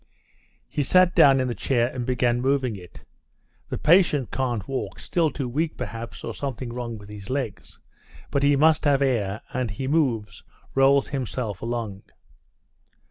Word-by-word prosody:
He 150 Hz, -, -2 dB
sat 185 Hz, +5 st, +4 dB
down 135 Hz, -2 st, +6 dB
in 130 Hz, -, 0 dB
the 120 Hz, -, -2 dB
chair 120 Hz, +2 st, +1 dB
and 125 Hz, -1 st, -4 dB
began 125 Hz, -1 st, +1 dB
moving 130 Hz, -3 st, +1 dB
it. 90 Hz, -3 st, -13 dB, 0.7 s
"The -, -, -3 dB
patient 155 Hz, -, +3 dB
can't 120 Hz, -7 st, -2 dB
walk—still 155 Hz, +4 st, -1 dB
too 135 Hz, -1 st, -4 dB
weak, 155 Hz, +6 st, -2 dB
perhaps, 115 Hz, -1 st, -6 dB
or -, -, -4 dB
something 130 Hz, -3 st, -5 dB
wrong 120 Hz, -1 st, -5 dB
with 105 Hz, -1 st, -13 dB
his 105 Hz, +1 st, -10 dB
legs, 130 Hz, -5 st, -4 dB, 0.5 s
but 140 Hz, -, +1 dB
he 140 Hz, 0 st, +4 dB
must 155 Hz, +3 st, +4 dB
have 140 Hz, -1 st, +3 dB
air, 110 Hz, -6 st, 0 dB
and 125 Hz, -2 st, -1 dB
he 120 Hz, +7 st, -4 dB
moves, 120 Hz, -10 st, 0 dB, 0.3 s
rolls 135 Hz, +1 st, +4 dB
himself 120 Hz, -6 st, -3 dB
along...." 115 Hz, -4 st, -4 dB
125 Hz, 155 wpm, -24 LUFS, 115-140 Hz, 0.7 s, down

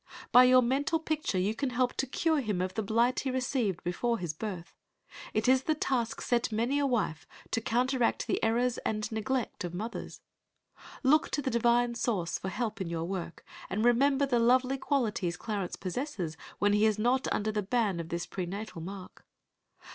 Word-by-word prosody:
By 250 Hz, +1 st, +9 dB
your 255 Hz, 0 st, +6 dB
mental 280 Hz, +6 st, +1 dB
picture 310 Hz, -9 st, -2 dB
you 195 Hz, +4 st, +1 dB
can 265 Hz, +4 st, -2 dB
help 250 Hz, 0 st, +1 dB
to 270 Hz, -, 0 dB
cure 320 Hz, +4 st, +1 dB
him 210 Hz, -7 st, -2 dB
of 185 Hz, 0 st, -2 dB
the 220 Hz, -, -1 dB
blight 230 Hz, +4 st, +2 dB
he 270 Hz, -, -2 dB
received 250 Hz, -7 st, -1 dB
before 230 Hz, +7 st, 0 dB
his 175 Hz, -6 st, -3 dB
birth. 180 Hz, -1 st, -6 dB, 0.6 s
It 215 Hz, +2 st, 0 dB
is 260 Hz, 0 st, +5 dB
the 310 Hz, +3 st, 0 dB
task 245 Hz, -6 st, -1 dB
set 240 Hz, -2 st, 0 dB
many 235 Hz, +6 st, +1 dB
a 285 Hz, -, +2 dB
wife, 210 Hz, -, -1 dB, 0.2 s
to 230 Hz, -, 0 dB
counteract 245 Hz, +2 st, +1 dB
the -, -, -1 dB
errors 240 Hz, +2 st, +1 dB
and 215 Hz, 0 st, -2 dB
neglect 225 Hz, +2 st, -2 dB
of 175 Hz, 0 st, -5 dB
mothers. 220 Hz, +6 st, -6 dB, 0.8 s
Look 300 Hz, +4 st, +4 dB
to 290 Hz, -, -1 dB
the 260 Hz, -, -1 dB
Divine 235 Hz, +1 st, +3 dB
source 205 Hz, -7 st, -1 dB
for 190 Hz, -, -4 dB
help 220 Hz, 0 st, -3 dB
in 180 Hz, -, -3 dB
your 165 Hz, -1 st, -2 dB
work, 175 Hz, -2 st, -5 dB, 0.2 s
and 215 Hz, +4 st, 0 dB
remember 270 Hz, +3 st, +4 dB
the 250 Hz, -3 st, +1 dB
lovely 255 Hz, +3 st, +3 dB
qualities 210 Hz, -, 0 dB
Clarence 205 Hz, -5 st, -3 dB
possesses 185 Hz, -, -4 dB, 0.2 s
when 205 Hz, 0 st, +2 dB
he 210 Hz, +1 st, +4 dB
is 215 Hz, -1 st, +1 dB
not 245 Hz, +4 st, +1 dB
under 215 Hz, +1 st, 0 dB
the 210 Hz, 0 st, -1 dB
ban 205 Hz, -3 st, 0 dB
of 165 Hz, -1 st, -5 dB
this 170 Hz, 0 st, -3 dB
prenatal 190 Hz, 0 st, -5 dB
mark. 190 Hz, +2 st, -9 dB
230 Hz, 185 wpm, -30 LUFS, 195-255 Hz, 0.8 s, By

